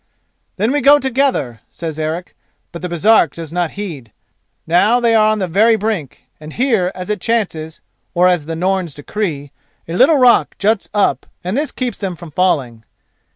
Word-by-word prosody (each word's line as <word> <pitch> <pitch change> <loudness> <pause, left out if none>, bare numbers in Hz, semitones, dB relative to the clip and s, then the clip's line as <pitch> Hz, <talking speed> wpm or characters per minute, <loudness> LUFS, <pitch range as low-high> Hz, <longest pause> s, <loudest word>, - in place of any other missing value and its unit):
"Then 215 +5 0
we 290 +1 +1
go 285 +3 +7
together," 265 - -1
says 160 -2 -6
Eric, 160 +3 -4 0.4
but 170 - -8
the 180 - -4
Baresark 175 -2 +3
does 165 -1 -8
not 175 -2 0
heed. 155 - -6 0.5
Now 200 +9 +3
they 235 -1 +2
are 215 -1 +4
on 215 0 +2
the 190 -3 -2
very 215 +7 +4
brink, 210 - -3 0.2
and 155 0 -10
here 225 -8 +1
as 185 +2 -5
it 210 - -3
chances, 170 -9 -2 0.3
or 180 +1 +4
as 175 -5 +1
the 165 - -3
Norns 185 -2 -1
decree, 145 -3 -4 0.4
a 165 - -5
little 270 - +5
rock 250 -3 +4
juts 210 +1 0
up 205 -1 0 0.2
and 185 +4 -3
this 295 +2 -1
keeps 250 -4 -4
them 190 -3 -3
from 170 -1 -11
falling. 140 -10 0
185 Hz, 180 wpm, -17 LUFS, 165-225 Hz, 0.5 s, go